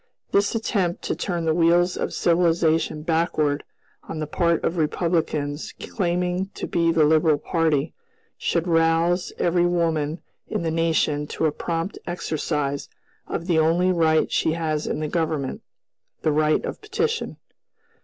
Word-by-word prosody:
This 200 +3 +2
attempt 195 -6 -1
to - - -1
turn 175 -3 -2
the 160 - +2
wheels 175 +2 +3
of - - -2
civilization 165 -2 +2
backward, 155 -3 +1 0.5
on 160 - -4
the 155 - -2
part 170 +2 +1
of 175 - -1
Republicans 155 -2 -1
claiming 180 -1 -1
to - - -4
be 170 -1 +1
the 165 -1 +3
liberal 155 0 +4
party, 160 -1 0 0.4
should 170 0 -1
rouse 165 +2 +2
every 175 0 +2
woman 165 -2 0 0.2
in - - -2
the 165 - 0
nation 160 -3 +1
to 160 - -2
a 155 - +3
prompt 165 +5 -3
exercise 150 -4 -2 0.4
of 165 - -3
the 170 -3 +2
only 170 +4 +3
right 160 -3 +2
she 160 - +1
has 155 -2 -2
in - - -2
the 155 - -1
Government, 155 -4 -2 0.6
the 155 - +3
right 155 +1 +2
of - - -6
petition. 450 +2 -2
165 Hz, 145 wpm, -23 LUFS, 155-175 Hz, 0.6 s, liberal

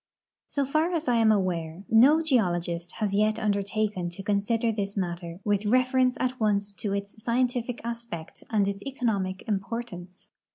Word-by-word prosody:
So 280 -1 0
far 310 +5 +1
as 325 -1 -2
I 245 -1 +3
am 225 -1 +5
aware, 180 -3 -1
no 280 +9 +6
geologist 175 - 0
has 210 -3 -2
yet 215 +2 +2
undertaken 200 -2 -1
to 175 +3 -9
consider 210 +3 +1
this 205 -1 -3
matter 175 -2 -3
with 205 -1 +1
refer 255 +4 +3
ence 255 -1 +3
at 255 0 -1
once 205 -2 +1
to 200 0 -3
its 200 +2 -6
scientific 245 0 0
aspect 230 -8 -6
and 205 -3 +2
its 200 0 -3
economic 210 -9 -2
importance. 195 -3 -5
210 Hz, 160 wpm, -27 LUFS, 195-240 Hz, -, no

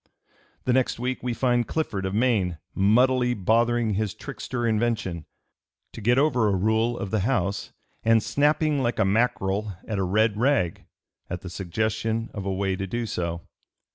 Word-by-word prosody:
The 125 - +1
next 130 0 +1
week 125 +1 -2
we 125 -2 -2
find 120 -2 +1
Clifford, 100 -12 -2
of 95 - -3
Maine, 105 -8 +1 0.2
"muddily 125 +5 +3
bothering 115 +2 +2
his 105 0 -1
trickster 120 -2 -5
invention" 110 -7 0 0.7
to - - -8
get 120 +4 +3
over 130 -6 +3
a 100 - +2
rule 110 +5 +1
of 100 - -5
the 110 - +1
House, 100 -3 -1 0.3
and 115 -1 +4
"snapping 150 0 +2
like 120 -3 0
a - - +3
mackerel 105 -1 0
at 105 -3 -2
a - - +1
red 105 +3 +2
rag" 125 -10 +1 0.4
at 90 0 -4
the 90 - -8
suggestion 110 +5 -2
of 100 -2 -5
a - - 0
way 95 0 0
to 95 +1 -4
do 120 +5 -2
so. 85 -4 -3
110 Hz, 170 wpm, -25 LUFS, 95-120 Hz, 0.7 s, and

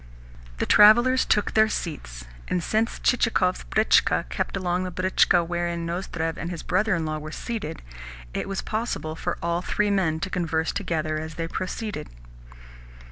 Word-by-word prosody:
The - - 0
travellers 240 +5 +6
then - - -19
took 210 - +2
their 220 0 +4
seats, 60 - -5 0.2
and 180 - -1
since 220 +2 0
Chichikov's 220 -7 +1
britchka 215 +1 +3
kept - - -2
alongside 180 -1 -2
the 185 - -2
britchka 180 -2 +4
wherein 170 -1 -2
Nozdrev 170 -2 -3
and 170 - -4
his 175 -2 -6
brother 210 +2 +1
in 165 -1 -2
law 155 0 -2
were 155 +1 -8
seated, 205 -5 -5 0.5
it - - -3
was 195 - -3
possible 215 -8 -3
for 175 +1 -3
all 170 +1 0
three 210 +2 0
men 170 -6 +1
to 190 0 -3
converse 160 -2 0
together 155 -5 -2
as 160 0 -7
they 165 0 -3
proceeded. 190 - -4
175 Hz, 165 wpm, -25 LUFS, 165-210 Hz, 0.5 s, travellers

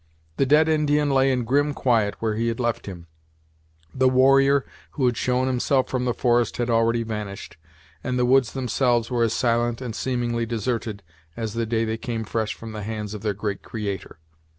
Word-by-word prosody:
The 135 - +2
dead 150 +3 +5
Indian 150 -2 +2
lay 135 0 +3
in 125 -2 0
grim 145 +4 +1
quiet 110 -5 +1
where 110 -1 -1
he 115 +2 -1
had 115 +1 -2
left 120 -3 -1
him, 85 -3 -8 0.9
the 130 0 +3
warrior 135 +2 +4 0.3
who 135 - 0
had 120 -1 +2
shown 125 +1 0
himself 130 +1 +1
from 125 -1 -1
the 120 - +1
forest 120 -2 +1
had 120 0 -1
already 115 0 +2
vanished, 105 -3 -6 0.5
and 125 -1 -1
the 125 - +2
woods 130 -1 +3
themselves 125 -2 0
were 120 -1 0
as 115 -1 +1
silent 120 -1 +1
and 120 -4 -5
seemingly 120 -2 -1
deserted 115 -2 -3 0.3
as 110 -2 -3
the 115 -1 -2
day 115 0 0
they 110 0 -2
came 115 -1 -4
fresh 110 0 -2
from 115 -1 -9
the 105 -1 -6
hands 105 0 -5
of 105 - -6
their 105 -2 -1
great 100 -1 -3
Creator. 100 -6 -5
120 Hz, 195 wpm, -24 LUFS, 110-130 Hz, 0.9 s, dead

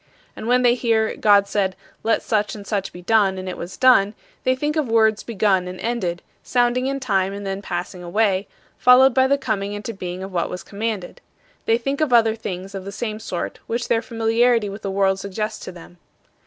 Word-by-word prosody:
And 220 - -7
when 250 +1 +3
they 240 -1 +5
hear, 225 -3 +1
"God 205 -1 +4
said, 195 -2 0 0.3
'Let 225 - +1
such 210 -1 0
and 205 -1 -9
such 200 -2 -2
be 180 - -11
done,' 200 -2 +3
and 185 0 -6
it 185 - -4
was 175 +2 -8
done," 220 -5 +5 0.3
they 255 - +3
think 295 +3 -2
of 305 -4 0
words 220 -1 +3
begun 195 -5 +1
and 180 0 -7
ended, 190 -8 -2 0.2
sounding 245 +1 +1
in 275 0 -2
time 195 -6 0
and 200 0 -6
then 195 0 -3
passing 180 -1 -5
away, 195 +2 +1 0.3
followed 250 +1 +6
by 260 +1 +4
the 280 +1 +3
coming 205 -6 -2
into 210 +2 -5
being 185 -1 -6
of 195 - -7
what 170 - 0
was 180 - -6
commanded. 210 -3 -4 0.5
They 225 - +4
think 275 +5 -3
of 305 -4 +1
other 225 -2 +5
things 190 -3 -6
of 195 -1 -5
the 200 - -7
same 215 +1 -4
sort 185 -5 -5
which 235 +1 -3
their 225 -1 +2
familiarity 230 -1 +1
with 200 +2 -8
the 200 - -3
world 195 0 +1
suggests 215 +2 -4
to - - -6
them. 175 0 -14
215 Hz, 210 wpm, -22 LUFS, 195-235 Hz, 0.5 s, followed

